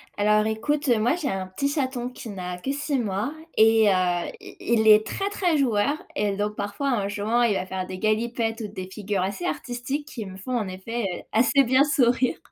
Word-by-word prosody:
Alors 210 +1 +3
écoute, 285 +7 -1
moi, 235 +4 +3
j'ai 315 -6 -2
un 190 -3 -3
petit 190 +10 -2
chaton 260 -4 -2
qui 250 -2 -9
n'a 180 -3 -5
que 265 - -3
6 285 0 -1
mois 215 +3 -2 0.2
et 220 0 +6
heu, - - +4 0.5
i - - -11
il 220 -1 +1
est 215 0 +7
très 390 - -2
très 360 -6 +1
joueur 255 0 +2 0.2
et 205 -7 0
donc 210 +1 -2
parfois 205 +8 -2
en 205 -5 0
jouant, 215 +4 0
il 230 -3 +3
va 185 - -2
faire 185 0 -4
des 185 0 -7
galipettes 225 +1 0
ou 215 - -3
des 185 -2 -7
figures 200 0 -2
assez 200 - -3
artistiques 265 0 -3
qui 230 -8 -6
me 190 -1 -9
font 245 +6 -3
en 215 -4 -2
effet, 210 +6 -4 0.2
heu, - - -10
assez 255 +5 +4
bien 260 +2 +4
sourire 255 -4 +2
225 Hz, 210 wpm, -25 LUFS, 205-260 Hz, 0.5 s, est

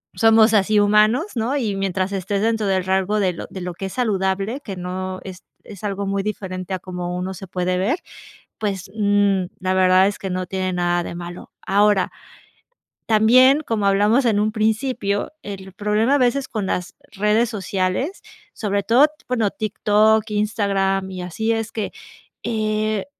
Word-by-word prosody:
somos 225 0 +5
así 210 0 +3
humanos, 210 +7 +4
¿no? 240 +5 0
Y 220 -7 -1
mientras 195 0 -1
estés 195 +1 -2
dentro 225 -2 +1
del 190 -2 +1
rango 190 +2 +1
de 185 -3 +1
lo 165 - -7
de 190 - -7
lo 180 0 -4
que 195 - -6
es 190 - -8
saludable, 200 +1 -1
que 200 -8 -7
no 185 +1 -4
es 185 -1 -9 0.2
es 200 -3 -12
algo 200 -1 -2
muy 195 0 -1
diferente 190 -3 -4
a - - -6
como 180 -1 -5
uno 185 +1 -3
se 190 +1 -9
puede 180 0 -1
ver. 220 - +1 0.6
Pues, 195 -3 -3
mm, 205 -2 +2 0.2
la 185 0 0
verdad 185 0 +5
es 205 - -2
que 195 - -4
no 185 0 -2
tiene 185 0 -2
nada 175 0 0
de - - -6
malo. 175 0 -8
Ahora, 205 -1 +2 1.0
también, 255 +6 +5
como 225 -8 -2
hablamos 210 +6 +3
en 215 -3 +3
un 215 +1 +1
principio, 220 -1 0
el 190 -2 -8
problema 210 +6 +1
a - - +4
veces 255 +2 +1
con 210 -4 -3
las 180 -1 -3 0.2
redes 210 +3 +1
sociales, 195 - -2 0.3
sobre 200 -2 -1
todo, 235 +8 +5 0.2
bueno, 230 -5 0
TikTok, 215 +1 +2
Instagram 195 -2 0
y 185 -1 -6
así, 220 +6 -2
es 225 -1 -3
que, 215 -3 -3 0.5
eh, 215 -2 -1
200 Hz, 170 wpm, -21 LUFS, 190-220 Hz, 1.0 s, somos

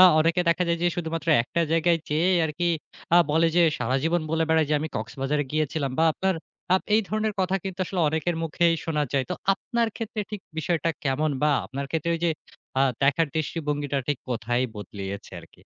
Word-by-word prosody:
আ - - +10 0.2
অনেকে 165 +3 +2
দেখা 170 +2 +3
যায় 170 0 +1
যে 175 - +4
শুধুমাত্র 165 -1 -3
একটা 150 +7 -2
জায়গায় 165 +1 +3
যেয়ে 160 +5 +2
আরকি 170 +3 -1 0.5
আ - - +8
বলে 165 +2 +4
যে, 175 - +6 0.2
সারাজীবন 135 +8 +1
বলে 160 0 +2
বেড়ায় 160 -2 +3
যে 150 - +3
আমি 160 - -3
কক্সবাজারে 135 +6 -2
গিয়েছিলাম। 155 -2 0
বা 160 - +5
আপনার 190 +2 0 0.4
আপ 190 - +2
এই 220 - +5
ধরনের 215 0 -1
কথা 185 +1 +1
কিন্তু 190 -1 -5
আসলে 185 0 -2
অনেকের 160 +2 -1
মুখেই 165 +1 +2
শোনা 150 -2 0
যায়। 135 -2 +2
তো - - 0 0.2
আপনার 235 +3 -1
ক্ষেত্রে 225 -1 -4
ঠিক 210 -2 -5 0.2
বিষয়টা 165 +1 0
কেমন 145 +3 +1
বা 150 - +4
আপনার 140 +1 -5
ক্ষেত্রে 165 +1 -1
ওই 165 - -4
যে 170 - +3 0.5
আ - - +6 0.2
দেখার 145 +4 +3
দৃষ্টিভঙ্গিটা 145 -2 -1
ঠিক 145 -4 0
কোথায় 120 +1 0
বদলিয়েছে 100 0 -7
আরকি? - - -19
160 Hz, 190 wpm, -25 LUFS, 145-175 Hz, 0.5 s, আ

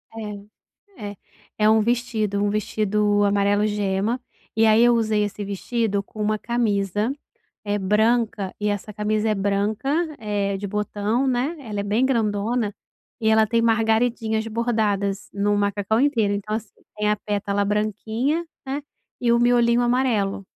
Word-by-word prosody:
É, 210 -1 -8 0.5
é. 205 - -10 0.4
É 215 0 +4
um 220 - +5
vestido, 220 -4 0
um 205 - +1
vestido 210 0 +1
amarelo 205 +1 +2
gema. 205 +3 -1 0.4
E 225 - +5
aí 220 +1 +5
eu 240 0 +6
usei 215 -2 +1
esse 205 0 -4
vestido 200 +1 -1
com 215 +2 -12
uma 215 0 +1
camisa, 210 -1 0 0.5
eh, 205 0 -1
branca 215 0 +1
e 210 - 0
essa 205 +1 -3
camisa 215 +1 0
é 215 - +2
branca, 205 +4 -1 0.3
é 205 -2 -1
de 200 - -5
botão, 210 +4 -1
né, 260 +6 0
ela 215 -6 -4
é - - -1
bem 215 +5 +1
grandona 220 -2 0 0.5
e 220 - +1
ela 220 0 +5
tem 230 +1 +1
margaridinhas 225 0 +1
bordadas 215 -4 -1
no 205 +1 +1
macacão 205 +2 +1
inteiro. 230 -8 +2
Então, 210 +1 -3
assim, 220 -2 -7 0.3
tem 210 0 +1
a 210 - +2
pétala 205 -1 -1
branquinha, 220 - -1 0.2
né, 275 +2 -3 0.4
e 240 - +2
o 235 - +4
miolinho 240 0 +3
amarelo. 240 -6 +1
215 Hz, 150 wpm, -23 LUFS, 205-230 Hz, 0.5 s, eu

